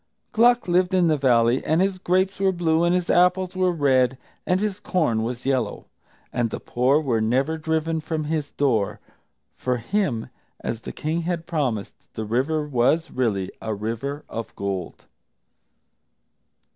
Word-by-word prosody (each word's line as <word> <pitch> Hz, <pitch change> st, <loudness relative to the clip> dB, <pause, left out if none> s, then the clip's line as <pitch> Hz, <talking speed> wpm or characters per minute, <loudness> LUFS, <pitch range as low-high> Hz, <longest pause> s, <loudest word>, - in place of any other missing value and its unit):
Gluck 240 Hz, +1 st, +4 dB
lived 180 Hz, +1 st, +2 dB
in 175 Hz, -2 st, +4 dB
the 155 Hz, -, +4 dB
Valley, 120 Hz, -2 st, +3 dB
and 160 Hz, +2 st, +2 dB
his 190 Hz, 0 st, +1 dB
grapes 185 Hz, +1 st, +1 dB
were 195 Hz, -1 st, +3 dB
blue, 170 Hz, -2 st, +1 dB
and 175 Hz, +1 st, +3 dB
his 180 Hz, -1 st, 0 dB
apples 180 Hz, +1 st, +3 dB
were 185 Hz, -1 st, +2 dB
red, 135 Hz, -5 st, +2 dB, 0.3 s
and 180 Hz, +1 st, +2 dB
his 210 Hz, -1 st, -2 dB
corn 155 Hz, -, 0 dB
was 120 Hz, +2 st, -4 dB
yellow; 135 Hz, -2 st, -1 dB, 0.5 s
and 120 Hz, -1 st, 0 dB
the -, -, -5 dB
poor 130 Hz, +4 st, +2 dB
were 125 Hz, -7 st, 0 dB
never 130 Hz, +8 st, +1 dB
driven 160 Hz, 0 st, -1 dB
from 155 Hz, 0 st, -3 dB
his 150 Hz, -1 st, -2 dB
door. 115 Hz, -8 st, 0 dB, 0.6 s
For 125 Hz, -, -1 dB
him, 120 Hz, -, -1 dB, 0.3 s
as 115 Hz, -1 st, -4 dB
the -, -, -6 dB
King 160 Hz, +3 st, -2 dB
had 170 Hz, -1 st, -3 dB
promised, 130 Hz, -, -2 dB, 0.2 s
the 110 Hz, -, -3 dB
river 145 Hz, +7 st, 0 dB
was 145 Hz, +5 st, +1 dB
really 105 Hz, -7 st, -1 dB
a 110 Hz, -1 st, -2 dB
River 115 Hz, +8 st, -4 dB
of 115 Hz, 0 st, -6 dB
Gold. 95 Hz, -3 st, -4 dB
150 Hz, 160 wpm, -24 LUFS, 120-175 Hz, 0.6 s, Gluck